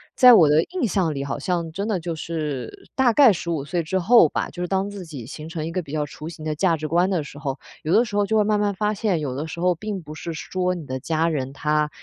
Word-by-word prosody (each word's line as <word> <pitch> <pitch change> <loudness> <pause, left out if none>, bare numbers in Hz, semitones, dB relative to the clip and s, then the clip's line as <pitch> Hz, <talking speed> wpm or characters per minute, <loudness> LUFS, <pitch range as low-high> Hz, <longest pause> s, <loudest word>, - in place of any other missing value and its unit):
在 250 -1 +8
我 175 -9 +7
的 155 +2 +4
印 355 -10 -2
象 175 -4 0
里， 140 -1 -3
好 140 +1 -3
像 170 +1 -2
真 200 +6 -3
的 200 -5 0
就 170 0 -4
是 150 -6 -5
大 255 -3 +3
概 260 -4 +7
15 165 -5 -3
岁 170 +3 -1
之 175 +4 -1
后 205 -4 +6
吧， - - -2
就 175 - -8
是 180 - -2
当 195 +1 0
自 200 -3 -8
己 140 -8 -8
形 155 +6 -8
成 160 -2 -4
一 165 - -4
个 185 +1 -1
比 145 - -12
较 150 -1 -1
雏 150 +2 -8
形 155 -2 -9
的 155 - -1
价 170 0 +2
值 155 0 -4
观 175 +4 +2
的 175 -6 0
时 145 0 -11
候， 135 -2 -4 0.2
有 155 - 0
的 240 - +5
时 210 - -6
候 205 - +3
就 220 +2 +1
会 210 - +4
慢 210 0 +1
慢 205 -1 +1
发 210 +2 0
现， 200 -5 0
有 140 -4 -3
的 150 +4 -4
时 160 - -7
候 180 +1 +3
并 205 +2 -5
不 150 0 -9
是 165 +2 -6
说 180 +3 -2
你 165 -4 -7
的 130 -1 -4
家 160 +3 0
人 135 -4 -2
他， 150 +1 0
170 Hz, 305 characters per minute, -23 LUFS, 150-195 Hz, 0.2 s, 在